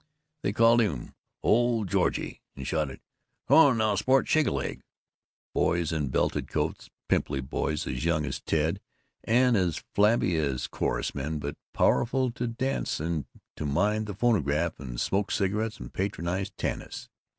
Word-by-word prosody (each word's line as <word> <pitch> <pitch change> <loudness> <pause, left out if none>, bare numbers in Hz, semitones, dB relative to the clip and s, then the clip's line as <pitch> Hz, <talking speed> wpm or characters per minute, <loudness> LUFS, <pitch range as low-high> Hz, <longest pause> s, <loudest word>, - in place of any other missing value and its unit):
They - - 0
called 115 +2 +5
him 75 - -2 0.3
"Old 115 -2 +3
Georgie" - - 0
and 70 - -7
shouted, 75 -2 -2 0.5
"Come - - +6
on 140 -7 +6
now, 110 -1 +2
sport; 130 +6 +3
shake 155 -1 +3
a - - +1
leg"... - - -3 0.7
boys 85 -1 +1
in 75 -3 -1
belted - - 0
coats, - - -2 0.2
pimply 70 -2 +1
boys, 75 +3 -2
as 65 +2 -3
young 80 -2 +1
as 65 - -4
Ted - - 0 0.4
and 125 +1 +4
as 90 -6 0
flabby 105 -4 +3
as 65 -6 -1
chorus - - -2
men, 75 +3 -3
but 70 0 -4 0.2
powerful 130 +1 +2
to 120 +1 -3
dance 130 +4 -2
and 80 -1 -2 0.3
to 75 - -3
mind 105 +8 +1
the 105 - -5
phonograph 85 - +1
and 60 -4 -6
smoke 100 - 0
cigarettes 105 +2 -1
and - - -9
patronize 95 -1 -2
Tanis. - - -5
95 Hz, 155 wpm, -28 LUFS, 75-115 Hz, 0.7 s, Come